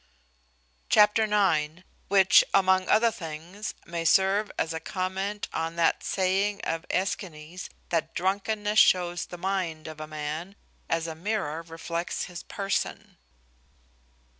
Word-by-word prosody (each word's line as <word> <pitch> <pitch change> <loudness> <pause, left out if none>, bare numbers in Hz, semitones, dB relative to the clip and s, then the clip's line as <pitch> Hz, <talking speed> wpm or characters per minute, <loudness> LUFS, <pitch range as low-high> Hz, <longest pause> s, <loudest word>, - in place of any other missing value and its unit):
Chapter 210 +1 +5
ix. 175 -6 +1 0.2
Which, 190 -1 +6
among 190 -1 +3
other 230 +2 +5
things, 175 +1 -7
may 170 -1 -4
serve 195 +5 +3
as 160 - -1
a 160 - -3
comment 190 +4 -3
on 165 +1 -2
that 170 -1 +2
saying 195 +2 0
of 165 +1 -3
Aeschines, 180 -3 -3 0.2
that 165 -2 -1
"drunkenness 205 +3 0
shows 175 -1 +3
the 175 - -8
mind 175 -4 -2
of 155 -1 -8
a 155 - -6
man, 155 +5 -5 0.3
as 165 0 0
a 165 - -4
mirrour 165 -3 -2
reflects 170 +1 -4
his 175 -1 -7
person." 195 -1 -3
185 Hz, 125 wpm, -27 LUFS, 165-200 Hz, 0.3 s, Which